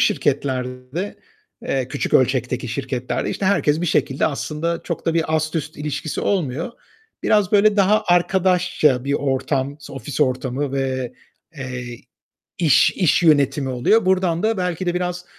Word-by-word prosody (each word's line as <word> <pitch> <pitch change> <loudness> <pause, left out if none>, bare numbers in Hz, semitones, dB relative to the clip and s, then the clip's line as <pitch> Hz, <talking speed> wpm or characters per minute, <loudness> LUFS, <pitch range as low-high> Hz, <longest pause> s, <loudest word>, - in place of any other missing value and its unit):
şirketlerde, 130 +4 -1 0.5
eee, 130 -2 -1
küçük - - -3
ölçekteki 125 -1 +1
şirketlerde, 130 0 -3
işte, 195 - -2
herkes 160 -5 +2
bir 175 - -1
şekilde 135 -3 +1
aslında 160 +3 -2
çok 170 - -5
da 165 - +1
bir 160 -1 +1
ast 155 +1 -2
üst 155 0 -4
ilişkisi 150 +1 -4
olmuyor. 170 - -1 0.5
Biraz 210 -3 +2
böyle 210 0 +5
daha 205 +2 +3
arkadaşça 175 -7 +2
bir 140 - -1
ortam 135 0 -1
ofis 135 +2 -6
ortamı 130 +1 0
ve, 130 -2 -2 0.4
eee, 125 -2 -6 0.6
iş 160 -6 +4
iş 180 -1 +2
yönetimi 145 -3 +3
oluyor, 155 - +2
buradan 185 -2 +1
da 220 -1 +1
belki 180 0 -2
de 175 - 0
biraz 180 0 -3
150 Hz, 140 wpm, -21 LUFS, 130-180 Hz, 0.6 s, böyle